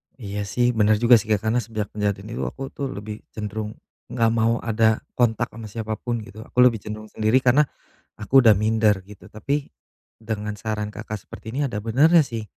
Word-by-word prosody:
Iya 105 -4 -5
sih 120 +4 +1
bener 110 0 +4
juga 120 +1 +7
sih, 105 - -8
Kak, 105 - +2
karena 115 +3 +2
sejak 110 -3 -4
kejadian 105 -1 -2
itu - - -2
aku 135 0 -6
tuh 140 - -4
lebih 105 +1 -7
cenderung 110 0 -4 0.3
gak 115 -1 +1
mau 115 +1 +1
ada 110 -1 +2 0.2
kontak 120 -3 +2
ama 115 0 -9
siapa 110 0 -4
pun 120 -2 -3
gitu, 105 +1 -12
aku 125 - +1
lebih 125 -2 +5
cenderung 110 0 -7
sendiri 110 +4 +2
karena 130 +4 +5 0.5
aku 120 +6 +4
udah 110 -4 +6
minder 110 -1 +3
gitu, 100 -2 -14
tapi 140 +7 -2 0.5
dengan 105 -1 -4
saran 105 0 -3
Kakak 110 -1 -6
seperti 110 - -9
ini 135 - -2
ada 105 - -4
benernya 150 +8 +5
sih. 115 -4 -5
110 Hz, 190 wpm, -23 LUFS, 105-120 Hz, 0.5 s, juga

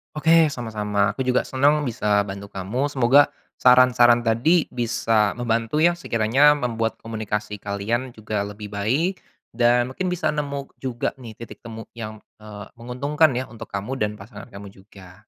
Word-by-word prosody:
Oke 160 +1 +4
sama-sama, 105 -6 -1
aku 130 +5 -4
juga 125 - +2
senang 145 +3 +2
bisa 105 -4 +1
bantu 100 0 -8
kamu, 105 +10 -3
semoga 140 +1 +4 0.3
saran-saran 125 -1 +5
tadi 130 +10 +3
bisa 115 -3 0
membantu 115 +5 0
ya, 175 - +6
sekiranya 140 -1 +3
membuat 115 -4 -2
komunikasi 105 -2 -4
kalian 115 +6 -3
juga 110 -1 -4
lebih 105 0 -9
baik, 135 - -1 0.3
dan 120 +1 +2
mungkin 185 +7 -3
bisa 180 -2 -1
nemu 140 -2 -4
juga 125 -3 -3
nih 115 -4 -10
titik 115 - -11
temu 115 -1 -9
yang, 110 -2 -8 0.2
eee, 105 -2 -10
menguntungkan 140 +4 +1
ya, 130 - -1
untuk 115 - -10
kamu 105 +7 -5
dan 105 -1 0
pasangan 105 +5 -12
kamu 100 -3 -11
juga. 95 -1 -16
115 Hz, 155 wpm, -23 LUFS, 105-130 Hz, 0.3 s, ya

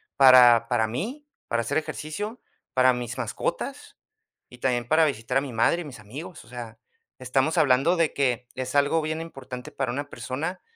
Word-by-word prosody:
para 125 -3 +7
para 120 -3 +2
mí, 235 - -5 0.2
para 115 - 0
hacer 125 +6 -1
ejercicio, 205 +10 -5 0.3
para 130 0 +5
mis 120 0 -5
mascotas 120 -4 -4 0.5
y 125 - -14
también 120 -2 0
para 160 +1 +4
visitar 125 -2 -1
a - - +3
mi 135 -2 -6
madre 170 +10 +2
y - - -7
mis 135 -6 -10
amigos. 145 - -9
O - - -20
sea, 120 -2 -8 0.4
estamos 130 +5 0
hablando 140 +6 +4
de 165 -2 +2
que 125 -3 0
es 130 +1 -4
algo 145 +3 +3
bien 155 +1 -3
importante 135 -6 -8
para 135 -3 -2
una 145 +3 -4
persona, 160 +8 -4
130 Hz, 180 wpm, -25 LUFS, 125-155 Hz, 0.5 s, para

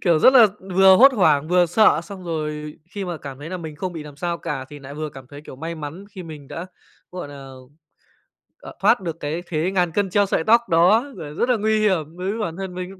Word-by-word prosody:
kiểu, 170 -4 +3
rất 255 - +6
là 245 -4 +8 0.3
vừa 190 0 +7
hốt 270 +6 +7
hoảng, 155 - +2
vừa 180 0 +4
sợ, 175 -2 +4
xong 195 -2 -10
rồi 150 -2 -4 0.2
khi 200 -2 -3
mà 175 -2 -4
cảm 140 -3 -9
thấy 150 +3 -8
là 185 - -3
mình 160 -3 -8
không 185 +3 -4
bị 160 - -6
làm 150 -1 -12
sao 170 +3 -3
cả, 135 -3 -4
thì 145 +1 -10
lại 140 0 -10
vừa 155 +1 -4
cảm 135 -2 -12
thấy, 145 0 -10
kiểu, 140 -3 -12
may 165 +4 -5
mắn 155 +4 -8
khi 190 -3 -9
mình 150 -4 -10
đã, 170 - -6 0.5
gọi 180 -5 -6
nà, 140 -1 -10 1.1
ờ, - - -10
thoát 240 - +4
được 165 -2 -5
cái 160 +4 -4
thế 165 +2 -1
ngàn 180 -3 +1
cân 195 +2 0
treo 205 +2 +3
sợi 190 - 0
tóc 230 +6 +5
đó, 185 +9 +4
r 150 -3 -8
rất 245 - +1
là 250 - +3
nguy 215 +1 +1
hiểm 170 -5 0
đối 185 +1 -3
với 225 - -5
bản 170 -6 -3
thân 190 -2 -5
mình 180 0 -5
lúc 190 -1 -13
170 Hz, 260 wpm, -22 LUFS, 150-190 Hz, 1.1 s, là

